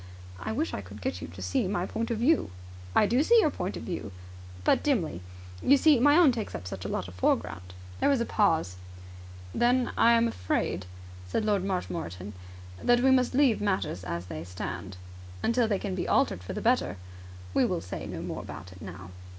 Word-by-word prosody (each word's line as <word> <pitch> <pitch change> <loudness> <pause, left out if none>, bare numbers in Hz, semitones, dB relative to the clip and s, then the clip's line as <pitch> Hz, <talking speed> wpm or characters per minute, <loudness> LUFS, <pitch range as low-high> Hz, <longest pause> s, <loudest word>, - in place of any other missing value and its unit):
"I - - -4
wish 295 +9 -1
I - - -3
could 100 +2 -11
get 90 -2 -3
you - - -5
to 90 +2 -9
see 90 - 0
my 185 -2 -1
point 230 +4 -3
of 230 - -1
view." 280 - +2 0.5
"I - - +6
do 240 +6 +2
see 465 +9 +6
your 310 -9 +3
point 185 -4 -4
of - - -7
view. 170 - -5 0.5
But - - +3
dimly. 185 - 0 0.4
You 280 - +5
see, 295 -2 +5
my 290 +5 +6
own 340 -6 +7
takes 225 -4 -4
up - - -6
such 95 0 -6
a - - -1
lot 90 - -3
of 90 - -10
the 90 - -14
foreground." 90 0 -1 0.2
There - - +3
was 275 -3 +3
a 235 - 0
pause. 160 - +1 0.8
"Then 245 +1 +2
I 235 - +5
am 230 0 +4
afraid," 90 - -2 0.4
said 150 - -1
Lord 205 -3 +2
Marshmoreton, 135 - -4 0.5
"that 240 0 +4
we 265 +1 +5
must 255 -1 +3
leave 265 -7 +4
matters 190 - -1
as 85 0 -4
they 80 -3 -6
stand." 90 +1 -6 0.5
"Until 235 0 +2
they 205 -2 +1
can 195 0 -4
be 185 - -2
altered 90 - +2
for 90 - -6
the - - -4
better." 90 - +1 0.6
"We - - +3
will - - 0
say 90 +2 -6
no - - -5
more - - -4
about 90 - -9
it 90 - -14
now." 95 -1 -9
190 Hz, 210 wpm, -28 LUFS, -, 0.8 s, own